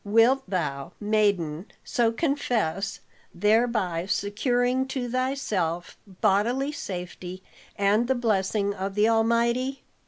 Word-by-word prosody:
Wilt 230 +6 +4
thou, 145 -7 -2
maiden, 200 -5 +1 0.2
so 235 -2 +1
confess, 225 - -1 0.3
thereby 210 -4 +1
securing 245 +6 +1
to 265 -2 -3
thyself 225 -10 -1 0.3
bodily 240 +8 +2
safety 185 -6 -6 0.3
and 205 +4 +2
the 265 - +2
blessing 205 -3 0
of 195 0 -4
the 210 +1 +4
Almighty?" 235 +4 +1
215 Hz, 100 wpm, -26 LUFS, 190-245 Hz, 0.3 s, Wilt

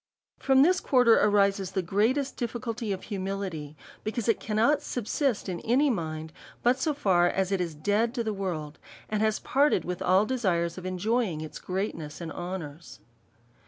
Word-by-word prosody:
From 265 0 +5
this 360 +3 +4
quarter 250 -8 +4
arises 200 -2 +2
the 190 - 0
great 205 +8 +2 0.2
difficulty 235 -2 -3
of 190 - -4
hu 205 -3 -5
mility, 185 -6 -4 0.3
because 220 +1 -3
it 230 - +2
cannot 225 +7 +2
subsist 245 0 -1
in 180 -2 -3
any 270 +5 +2
mind, 160 -5 -4 0.3
but 250 +2 +3
so 305 +1 0
far 180 -9 +3
as 190 0 -1
it 195 -2 +1
is 170 -3 -3
dead 210 - 0
to 235 - -1
the 220 -1 -2
world, 160 -7 -4 0.3
and 215 -1 -1
has 215 -1 +2
parted 285 +2 +2
with 180 0 -4
all 185 +3 +4
desires 180 -9 0
of 185 - -6
enjoying 185 -2 -1
all 155 - -6
greatness 180 -5 -4
and 165 -2 -6
honours. 170 -2 -7
200 Hz, 170 wpm, -28 LUFS, 175-235 Hz, 0.3 s, From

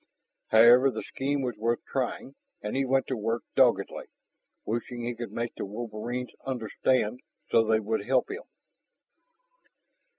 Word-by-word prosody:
However, 120 +4 +7
the - - -4
scheme 140 +1 -2
was 125 -3 -2
worth 115 +2 -1
trying, 135 0 -3 0.3
and 105 - -3
he 135 0 +1
went 135 0 +2
to 130 - -2
work 115 +1 -2
doggedly, - - +3 0.6
wishing 120 +2 -3
he 120 +1 -2
could 120 0 -6
make 115 0 -3
the - - -5
wolverines 115 +4 -5
understand 125 -1 0 0.3
so 115 - +5
they 110 0 +3
would 110 0 -2
help 130 -1 +2
him. 450 - -5
120 Hz, 140 wpm, -28 LUFS, 110-130 Hz, 0.6 s, However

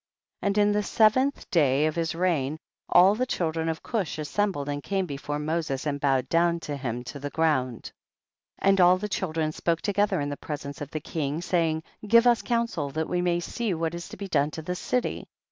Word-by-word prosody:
4. - - -2
And 200 +1 0
in 205 0 +4
the 210 0 +2
seventh 230 +7 +2
day 145 -3 +3
of 155 - +1
his 165 0 -1
reign, 160 -5 0 0.3
all 185 +3 +7
the 250 +4 -1
children 165 -5 -1
of 160 - -4
Cush 205 -9 -2
as 150 -1 -4
sembled 195 -8 0
and 145 0 -3
came 195 +4 -1
before 145 -1 -4
Moses 150 -3 -2
and 145 -1 -1
bowed 135 -2 +2
down 170 0 +2
to 145 - -4
him 125 -3 -4
to 140 +3 -8
the 145 +1 -4
ground, 135 -7 0 0.7
5. 195 - +3
And 195 -1 +4
all 180 +1 +6
the 210 +3 -4
children 160 -6 -1
spoke 165 +1 -1
to 205 - 0
gether 205 -3 +2
in 145 0 -2
the 145 - -4
presence 145 -1 -6
of 145 - -5
the 155 - -4
king, 150 -1 -3
saying, 165 -2 0 0.2
give 230 +3 +6
us 240 -2 +4
counsel 230 -11 -1
that 160 +3 -3
we 180 0 0
may 175 -1 +1
see 210 +2 -2
what 165 0 -2
is 170 +1 -6
to - - -9
be 200 - -5
done 145 -5 +2
to 160 +1 -7
this 180 +2 -4
city. 250 -1 -2
165 Hz, 225 wpm, -26 LUFS, 145-195 Hz, 0.7 s, all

